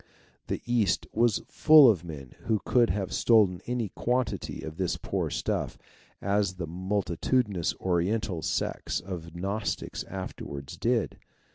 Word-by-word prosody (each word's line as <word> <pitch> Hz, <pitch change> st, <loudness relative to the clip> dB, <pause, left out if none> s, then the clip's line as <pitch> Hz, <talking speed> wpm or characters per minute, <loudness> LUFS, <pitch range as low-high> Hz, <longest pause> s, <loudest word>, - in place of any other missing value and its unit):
The -, -, -3 dB
East 120 Hz, -4 st, +1 dB
was 115 Hz, -1 st, +2 dB
full 155 Hz, -3 st, +7 dB
of 100 Hz, -8 st, +3 dB
men 75 Hz, -7 st, -8 dB
who 110 Hz, -2 st, +2 dB
could 120 Hz, -2 st, +4 dB
have 95 Hz, -2 st, -2 dB
stolen 105 Hz, -7 st, +4 dB
any 120 Hz, -4 st, -1 dB
quantity 125 Hz, +4 st, -2 dB
of 80 Hz, 0 st, -7 dB
this 95 Hz, -2 st, -1 dB
poor -, -, -2 dB
stuff, -, -, -2 dB, 0.5 s
as 100 Hz, -1 st, +1 dB
the 90 Hz, -2 st, -4 dB
multitudinous 95 Hz, +3 st, 0 dB
Oriental 90 Hz, 0 st, 0 dB
sects -, -, -1 dB
of 85 Hz, -3 st, -7 dB
Gnostics 100 Hz, +4 st, -3 dB
afterwards 85 Hz, -5 st, -7 dB
did. 115 Hz, +4 st, 0 dB
95 Hz, 130 wpm, -28 LUFS, 85-115 Hz, 0.5 s, full